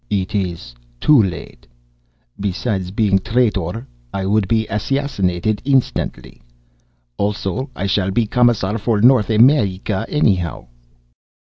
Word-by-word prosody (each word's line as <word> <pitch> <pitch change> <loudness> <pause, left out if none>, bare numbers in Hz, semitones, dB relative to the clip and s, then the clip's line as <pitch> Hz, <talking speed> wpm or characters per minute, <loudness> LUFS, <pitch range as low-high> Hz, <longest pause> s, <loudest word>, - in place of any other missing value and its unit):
"It 100 0 -2
is 85 - -3 0.3
too 150 -5 +5
late. 85 - -5 0.7
Besides 95 -1 -2
being 100 0 +2
a - - 0
traitor, 110 -2 -1 0.3
I 95 -1 -3
would 100 0 +1
be 110 +1 +1
assassinated 105 -4 -1
instantly. 135 -2 -1 0.8
Also, 100 +5 -2
I 100 - -3
shall 95 -1 0
be 110 +4 +1
Commissar 115 -2 +1
for 110 0 0
North 120 -1 +4
America 105 -5 +2
anyhow." 95 - 0
105 Hz, 115 wpm, -18 LUFS, 95-115 Hz, 0.8 s, too